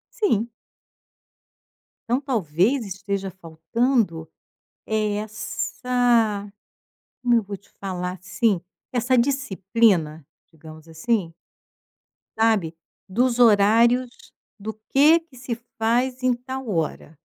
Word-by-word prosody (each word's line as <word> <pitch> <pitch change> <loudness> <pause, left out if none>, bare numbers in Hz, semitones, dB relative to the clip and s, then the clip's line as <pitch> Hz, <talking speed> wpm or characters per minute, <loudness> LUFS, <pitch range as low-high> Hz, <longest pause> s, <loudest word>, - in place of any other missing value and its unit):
Sim. 235 - +1 1.6
Então 245 +3 +2
talvez 225 - +1
esteja 195 0 -4
faltando 170 - -1 0.6
é 215 -1 0
essa 220 0 0 0.7
como 240 -1 +3
eu 230 - +2
vou 200 0 -6
te 200 - -28
falar 180 -1 -4
sim, 200 -1 0 0.3
essa 250 +1 +2
disciplina, 195 - +1 0.3
digamos 155 0 -13
assim 165 +1 -1 1.0
sabe, 210 -8 +2 0.3
dos 245 +4 +1
horários 230 +3 +5 0.5
do 215 +2 -5 0.2
que 305 +5 +6
que 325 -5 -22
se 245 -1 -4 0.2
faz 250 +3 0
em 255 -1 +4
tal 260 0 -6
hora. 160 -3 -3
220 Hz, 95 wpm, -23 LUFS, 185-245 Hz, 1.6 s, que